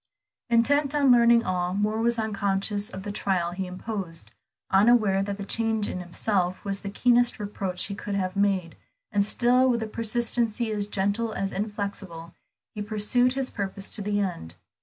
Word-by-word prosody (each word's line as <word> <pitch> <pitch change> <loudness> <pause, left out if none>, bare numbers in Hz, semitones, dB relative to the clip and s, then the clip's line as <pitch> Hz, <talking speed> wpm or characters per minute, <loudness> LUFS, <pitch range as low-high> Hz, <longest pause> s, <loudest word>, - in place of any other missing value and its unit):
Intent 280 +5 +3
on 280 -3 +4
learning 235 -1 +6
all, 180 -1 -1
Moor 210 +2 0
was 235 +1 +2
unconscious 205 -1 -1
of 190 -5 -8
the 205 - -4
trial 185 -4 -1
he 185 +1 -4
imposed, 185 -3 -6 0.4
unaware 200 -1 +4
that 200 0 -3
the 200 - -6
change 225 0 +1
in - - -4
himself 180 +1 -1
was 195 0 -2
the 200 - -5
keenest 245 +3 +3
reproach 200 -4 -4
he 200 - -5
could 200 +1 -4
have 185 -1 -2
made, 195 -4 0 0.4
and 205 -2 +2
still 250 +4 +3
with 235 -2 +1
a - - -4
persistency 230 0 0
as 205 -1 -2
gentle 205 +3 0
as 195 -1 -2
inflexible, 195 -5 -5 0.4
he 210 - -5
pursued 220 +4 +1
his 265 -1 -3
purpose 195 -1 -4
to 215 - +1
the 205 0 -1
end. 170 - -3
205 Hz, 170 wpm, -26 LUFS, 195-230 Hz, 0.4 s, learning